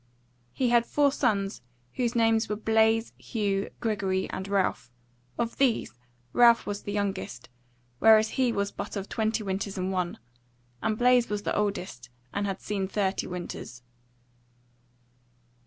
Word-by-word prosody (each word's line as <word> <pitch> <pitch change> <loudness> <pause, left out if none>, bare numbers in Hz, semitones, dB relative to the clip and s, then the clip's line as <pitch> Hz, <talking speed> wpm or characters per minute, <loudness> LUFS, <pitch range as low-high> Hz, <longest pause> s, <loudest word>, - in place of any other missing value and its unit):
He 255 -2 0
had 235 -1 +3
four 285 -1 +3
sons 205 -8 0 0.3
whose 245 -1 -1
names 225 -1 +3
were 210 - 0
Blaise, 220 +1 +2
Hugh, 200 -3 -1
Gregory 195 -4 -1
and 190 - -5
Ralph: 185 - 0 0.5
of 235 -1 -2
these 250 - +2 0.4
Ralph 235 -1 +6
was 205 0 -4
the 205 - -5
youngest, 195 -12 -3 0.5
whereas 220 0 +6
he 255 -2 +1
was 200 -2 -1
but - - -6
of 200 -1 -4
twenty 220 0 -1
winters 195 0 -3
and 185 +1 -1
one; 180 -2 -2 0.6
and 215 -1 0
Blaise 245 0 +4
was 205 0 -2
the - - -1
oldest 190 -12 -2 0.2
and 200 0 -1
had 195 - -4
seen 195 -2 -2
thirty 195 -1 -1
winters. 175 -8 -7
205 Hz, 140 wpm, -27 LUFS, 195-225 Hz, 0.6 s, Ralph